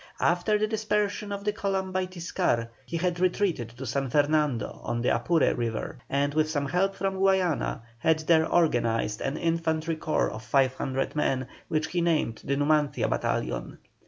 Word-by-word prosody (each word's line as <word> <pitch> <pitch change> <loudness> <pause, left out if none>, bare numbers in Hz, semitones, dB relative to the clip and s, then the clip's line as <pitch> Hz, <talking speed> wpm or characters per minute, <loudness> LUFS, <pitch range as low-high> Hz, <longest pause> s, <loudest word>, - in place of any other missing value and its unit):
After 180 +5 +2
the 215 - +1
dispersion 210 -1 -1
of 200 0 -4
the 210 0 0
column 195 -2 -2
by 185 0 0
Tiscar, 165 -10 -1 0.2
he 170 - -2
had 175 +1 -1
retreated 180 - +1
to 135 - -6
San 135 +2 -1
Fernando 145 -4 +1
on 120 0 -2
the - - +3
Apure 165 -4 +2
River, 115 -2 -3
and 140 +1 +1
with 155 0 +2
some 145 -3 -1
help 195 +6 +1
from 195 -1 -2
Guayana, 190 -10 +1 0.2
had 160 +5 +3
there 160 0 +3
organized 115 -9 +1
an 145 - -2
infantry 165 -1 0
corps 155 0 0
of 110 - -7
500 130 +2 0
men, 130 -4 0 0.2
which 155 0 -1
he 175 - 0
named 160 -9 0
the 140 - 0
"Numancia" 150 0 +2
battalion. - - -2
160 Hz, 165 wpm, -27 LUFS, 135-185 Hz, 0.2 s, the